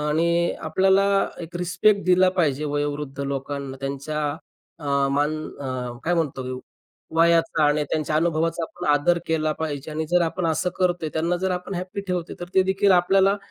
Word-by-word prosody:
आणि 170 Hz, +3 st, +1 dB, 0.2 s
आपल्याला 190 Hz, +1 st, +3 dB, 0.4 s
एक 170 Hz, +1 st, -7 dB
रिस्पेक्ट 190 Hz, +3 st, +2 dB
दिला 185 Hz, 0 st, +5 dB
पाहिजे 150 Hz, -4 st, +1 dB
वयोवृद्ध 145 Hz, -1 st, -3 dB
लोकांना 140 Hz, 0 st, -4 dB
त्यांच्या 145 Hz, +2 st, -3 dB, 0.5 s
अ, 150 Hz, -, -11 dB, 0.3 s
मान 145 Hz, +2 st, +1 dB, 0.3 s
अ, 125 Hz, -3 st, -4 dB
काय 175 Hz, +2 st, +2 dB
म्हणतो 150 Hz, -5 st, -1 dB, 0.7 s
वयाचा 165 Hz, -1 st, +3 dB
आणि 150 Hz, +1 st, +3 dB
त्यांच्या 155 Hz, 0 st, 0 dB
अनुभवाचा 165 Hz, +1 st, 0 dB
आपण 160 Hz, -, -6 dB
आदर 160 Hz, +4 st, +3 dB
केला 155 Hz, -1 st, +1 dB
पाहिजे. 150 Hz, -1 st, -4 dB
आणि 155 Hz, +1 st, -2 dB
जर 180 Hz, 0 st, +4 dB
आपण 170 Hz, +1 st, -1 dB
असं 165 Hz, +3 st, 0 dB
करतोय, 175 Hz, -3 st, 0 dB
त्यांना 170 Hz, +3 st, 0 dB
जर 190 Hz, -, +1 dB
आपण 180 Hz, +1 st, -3 dB
हॅपी 185 Hz, +3 st, -4 dB
ठेवतो. 180 Hz, -2 st, -3 dB
तर 175 Hz, -, -6 dB
ते 190 Hz, -, +6 dB
देखील 190 Hz, +1 st, +3 dB
आपल्याला 195 Hz, +3 st, +4 dB
165 Hz, 160 wpm, -24 LUFS, 145-180 Hz, 0.7 s, ते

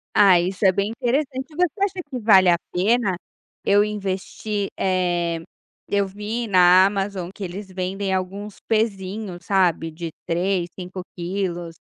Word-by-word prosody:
Ah, 190 Hz, -4 st, +7 dB
isso 185 Hz, +3 st, -1 dB
é 190 Hz, -, +7 dB
bem 200 Hz, +2 st, -1 dB
interessante. 260 Hz, +2 st, -1 dB
Você 360 Hz, +3 st, +1 dB
acha 400 Hz, -, +1 dB, 0.2 s
que 255 Hz, -, -4 dB
vale 195 Hz, -5 st, +6 dB
a 170 Hz, -, +6 dB, 0.2 s
pena 200 Hz, +1 st, +2 dB, 0.5 s
eu 205 Hz, +1 st, +4 dB
investir, 205 Hz, 0 st, -3 dB
eh, 175 Hz, -3 st, 0 dB, 0.5 s
eu 200 Hz, -1 st, +1 dB
vi 210 Hz, +4 st, -4 dB
na 185 Hz, -1 st, +6 dB
Amazon 195 Hz, -2 st, -2 dB
que 200 Hz, -, -8 dB
eles 190 Hz, +2 st, -6 dB
vendem 190 Hz, +1 st, -2 dB
alguns 195 Hz, +2 st, -4 dB
pezinho, 205 Hz, -3 st, -1 dB
sabe, 175 Hz, -4 st, +1 dB
de 165 Hz, +1 st, -6 dB, 0.2 s
3, 175 Hz, +1 st, 0 dB
5 185 Hz, 0 st, -7 dB
quilos. 175 Hz, -2 st, -3 dB
195 Hz, 140 wpm, -22 LUFS, 180-210 Hz, 0.5 s, Ah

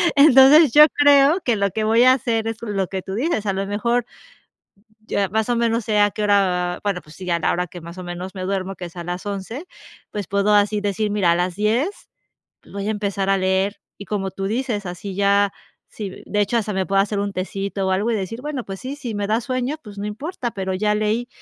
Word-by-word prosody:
entonces, 285 Hz, +1 st, +7 dB
yo 300 Hz, +3 st, +9 dB
creo 290 Hz, +4 st, +5 dB
que 240 Hz, -, +1 dB
lo 200 Hz, -1 st, 0 dB
que 220 Hz, -, -2 dB
voy 225 Hz, +2 st, +4 dB
a 255 Hz, 0 st, +7 dB
hacer 230 Hz, -4 st, -1 dB
es 225 Hz, -1 st, -3 dB
lo 200 Hz, -4 st, -2 dB
que 190 Hz, +1 st, -4 dB
tú 190 Hz, +1 st, -6 dB
dices, 240 Hz, -3 st, -1 dB
a 195 Hz, -, +1 dB
lo 195 Hz, +1 st, -2 dB
mejor 235 Hz, +4 st, 0 dB, 1.0 s
ya 200 Hz, -1 st, 0 dB
más 220 Hz, +4 st, -1 dB
o 240 Hz, -, +2 dB
menos 230 Hz, -1 st, 0 dB
sé 210 Hz, -1 st, +1 dB
a 205 Hz, 0 st, +4 dB
qué 210 Hz, -, -4 dB
hora, 205 Hz, -1 st, +4 dB, 0.3 s
va -, -, -12 dB
bueno, 200 Hz, -3 st, -1 dB
pues 150 Hz, 0 st, -16 dB
sí 185 Hz, -, -9 dB
ya 175 Hz, -1 st, +1 dB
es -, -, -8 dB
la -, -, +2 dB
hora 180 Hz, +1 st, -1 dB
que 175 Hz, +1 st, -10 dB
más 170 Hz, +2 st, -10 dB
o 185 Hz, -, -6 dB
menos 180 Hz, +2 st, -7 dB
me 185 Hz, -, -5 dB
duermo, 195 Hz, 0 st, -2 dB
que 180 Hz, -, -7 dB
es 175 Hz, -, -11 dB
a 175 Hz, -, -6 dB
las 175 Hz, +2 st, -5 dB
11 205 Hz, -, -5 dB, 0.5 s
pues 205 Hz, -4 st, -4 dB
puedo 200 Hz, +1 st, +2 dB
así 205 Hz, +1 st, +3 dB
decir: 205 Hz, +1 st, -1 dB
"Mira, 200 Hz, -5 st, +2 dB
a -, -, +3 dB
las 180 Hz, 0 st, -1 dB
10 235 Hz, -, -1 dB, 0.6 s
voy 200 Hz, +1 st, -4 dB
a -, -, +1 dB
empezar 200 Hz, -2 st, -1 dB
a 195 Hz, -, +3 dB
leer". 190 Hz, +2 st, 0 dB, 0.2 s
Y 200 Hz, -, -8 dB
como 195 Hz, -2 st, -2 dB
tú 195 Hz, -, -6 dB
dices, 225 Hz, -1 st, -2 dB
así 180 Hz, +2 st, -6 dB
ya, 200 Hz, 0 st, +2 dB, 0.4 s
sí, 200 Hz, -4 st, -8 dB
de 210 Hz, -, 0 dB
hecho, 220 Hz, +3 st, +1 dB
hasta 215 Hz, -2 st, -2 dB
me 190 Hz, 0 st, 0 dB
puedo 195 Hz, 0 st, +2 dB
hacer 200 Hz, +1 st, -1 dB
un 200 Hz, 0 st, -2 dB
tecito 195 Hz, +1 st, -3 dB
o -, -, 0 dB
algo 205 Hz, +5 st, 0 dB
y -, -, +1 dB
decir: 215 Hz, +4 st, -4 dB
"Bueno, 290 Hz, -4 st, -4 dB
pues 195 Hz, -1 st, -7 dB
sí, 265 Hz, +2 st, -5 dB
si 250 Hz, -6 st, -6 dB
me 205 Hz, 0 st, -2 dB
da 220 Hz, +3 st, +1 dB
sueño, 255 Hz, +3 st, -2 dB
pues 210 Hz, -3 st, -12 dB
no 205 Hz, -, -3 dB
importa, 245 Hz, -, -4 dB
pero 190 Hz, -1 st, -3 dB
ya 210 Hz, +2 st, +1 dB
leí", 215 Hz, +3 st, -1 dB
205 Hz, 250 wpm, -21 LUFS, 195-230 Hz, 1.0 s, yo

